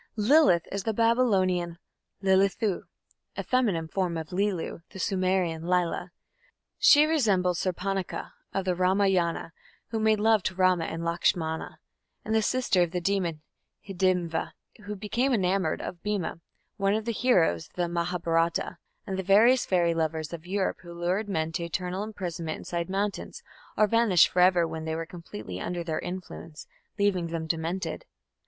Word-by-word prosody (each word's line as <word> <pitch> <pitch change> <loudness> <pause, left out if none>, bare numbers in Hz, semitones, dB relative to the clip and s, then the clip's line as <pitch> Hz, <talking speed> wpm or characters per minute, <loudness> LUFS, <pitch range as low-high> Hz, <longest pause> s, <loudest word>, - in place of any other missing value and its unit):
Lilith 215 - +4
is 200 - -2
the 220 +2 -2
Babylonian 195 -7 +2 0.5
Lilithu, 195 +1 +2 0.5
a - - -2
feminine 210 -11 +1
form 180 -1 -1
of 160 +1 -6
Lilu, 195 -3 -1
the 195 - -11
Sumerian 185 -4 0
Lila. 180 -1 0 0.7
She 295 +1 +7
resembles 200 - +2
Surpanakha 190 +1 -3 0.2
of 195 -1 -2
the 185 - +1
Ramayana, 185 -2 +1 0.4
who 225 - -2
made 215 -1 +3
love 220 0 +4
to 185 - -1
Rama 185 -2 +3
and 165 +1 -4
Lakshmana, 170 -1 -1 0.5
and 220 - -1
the 220 - +4
sister 240 -5 +1
of 175 - +2
the 180 +1 -2
demon 175 -4 -1 0.4
Hidimva, 180 -4 0 0.3
who 210 0 -4
became 235 +6 0
enamoured 190 -5 0
of 175 - -6
Bhima, 200 -5 -3 0.4
one 195 0 +2
of 215 0 -2
the 235 - 0
heroes 180 - +2
of - - -33
the 175 -1 0
Mahabharata, 170 -1 -1 0.3
and 190 -3 -3
the - - +1
various 220 +7 +5
fairy 175 -2 +2
lovers 160 -1 -2
of 170 0 -8
Europe 195 +1 -1
who 170 -1 -10
lured 185 +5 -1
men 160 -4 -1
to 170 +1 -3
eternal 180 +3 -3
imprisonment 175 -7 -5
inside 170 0 -4
mountains, 200 +1 -3 0.3
or 215 - +5
vanished 210 -5 +4
for 180 - -1
ever 180 -2 +5
when 160 0 -6
they 160 0 -2
were 165 0 -3
completely 105 - -8
under 175 -1 -3
their 160 -2 -2
influence, 175 -3 -7 0.3
leaving 195 -4 +1
them 165 -1 -4
demented. 165 +1 -3
185 Hz, 155 wpm, -27 LUFS, 170-200 Hz, 0.7 s, She